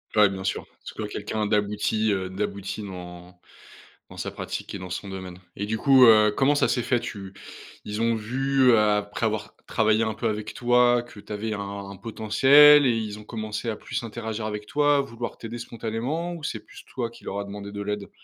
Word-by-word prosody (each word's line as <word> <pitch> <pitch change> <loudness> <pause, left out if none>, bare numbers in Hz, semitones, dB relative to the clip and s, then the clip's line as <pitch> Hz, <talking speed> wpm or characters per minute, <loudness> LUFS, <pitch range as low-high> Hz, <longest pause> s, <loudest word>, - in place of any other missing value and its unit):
Ouais, 105 -1 +6
bien 95 -1 -6
sûr. 95 - -2
Que - - -30
ce - - -8
soit 110 - -4
quelqu'un 105 +1 -3
d'abouti, 105 +1 +1
heu, 95 -2 -1
d'abouti 100 +1 -4
dans 90 -1 -9 0.7
dans - - -12
sa - - -3
pratique - - -6
et - - -4
dans 90 -1 -8
son 100 +3 -5
domaine 95 -2 -7 0.2
et 100 - -3
du 110 +1 -2
coup, 135 -1 +6
heu, 110 -2 +7
comment 140 +2 +4
ça 145 - +2
s'est 125 - +1
fait? 120 0 +1
Tu 100 -5 -7 0.5
ils 105 +2 -3
ont 115 0 +2
vu, 130 +3 +2
après 105 0 +1
avoir 110 -1 -2
travaillé 110 0 +2
un 110 - -1
peu 115 +2 -2
avec 105 0 -4
toi, 120 0 +3
que 120 -3 -14
tu 105 - -10
avais 110 +1 -3
un 100 -1 -6
potentiel 135 +8 +6
et 125 - +4
ils 105 -1 -4
ont 105 - -12
commencé 110 0 -4
à 110 - -4
plus - - -5
interagir 110 -1 -5
avec 105 -1 -4
toi, 145 +1 +3
à - - +4
vouloir 120 -3 -6
t'aider 115 +1 -7
spontanément 120 +10 -4
ou 165 - -9
c'est - - -3
plus - - -15
toi 120 -3 -4
qui 115 - -16
leur 100 - -4
a - - -4
demandé 100 0 -8
de 100 - -6
l'aide? 105 0 -4
110 Hz, 215 wpm, -25 LUFS, 100-120 Hz, 0.7 s, heu